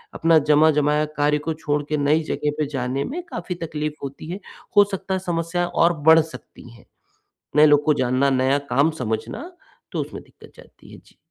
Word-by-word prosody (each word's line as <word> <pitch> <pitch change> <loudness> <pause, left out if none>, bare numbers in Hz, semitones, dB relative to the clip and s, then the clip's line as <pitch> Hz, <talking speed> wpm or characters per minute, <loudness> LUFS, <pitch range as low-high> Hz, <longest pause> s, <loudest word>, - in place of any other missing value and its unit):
अपना 165 -1 +4
जमा-जमाया 150 0 +3
कार्य 150 0 +2
को 160 - 0
छोड़ 150 -2 -2
के 155 - 0
नई 150 +2 +2
जगह 150 -1 -2
पे 155 - +1
जाने 130 +2 -2
में 340 +6 -5
काफ़ी 180 - -5
तकलीफ 150 -1 -4
होती 140 +2 -7
है। 190 - -5 0.4
हो 205 - +9
सकता 195 0 -4
है - - -2
समस्या 175 -1 -2
और 175 0 +2 0.2
बढ़ 160 0 +8
सकती 160 -6 -12
हैं। 115 - -18 0.7
नए 150 +1 +7
लोग 150 -1 +4
को 150 - +3
जानना, 130 +1 +1
नया 135 +1 +2 0.2
काम 145 +5 +4
समझना, 110 - -4 0.4
तो - - -2
उसमें - - -6
दिक्कत - - -18
जाती - - -17
है। - - -12
जी। - - -23
150 Hz, 190 wpm, -22 LUFS, 140-165 Hz, 0.7 s, हो